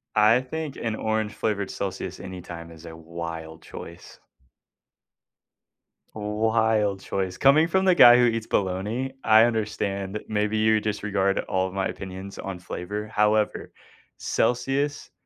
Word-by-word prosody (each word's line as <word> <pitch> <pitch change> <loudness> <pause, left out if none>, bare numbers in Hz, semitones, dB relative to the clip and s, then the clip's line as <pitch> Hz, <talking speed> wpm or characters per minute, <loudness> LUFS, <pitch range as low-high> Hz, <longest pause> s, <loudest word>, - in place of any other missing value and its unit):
I 110 +4 +5
think 150 +2 -5
an 115 -2 -3
orange-flavored 110 -2 -2
Celsius 95 -1 -5
anytime 85 -3 -8
is 80 -1 -14
a 80 -1 -9
wild 80 -1 -7
choice. 85 +1 -11 2.0
Wild 105 -1 +1
choice. 95 -2 -3
Coming 145 +4 +5
from 190 +2 +1
the 185 - +6
guy 120 -7 +9
who 125 - +4
eats 115 -2 0
bologna, 105 +8 -1
I 110 0 +7
understand. 105 -3 -1
Maybe 105 0 0
you 110 0 +3
disregard 100 -2 -1
all 95 0 -1
of 95 - -9
my 95 -1 0
opinions 95 0 -7
on 95 -2 -5
flavor, 100 +4 -5
however, 105 0 +1 0.5
Celsius 135 +4 -1
105 Hz, 125 wpm, -25 LUFS, 95-115 Hz, 2.0 s, guy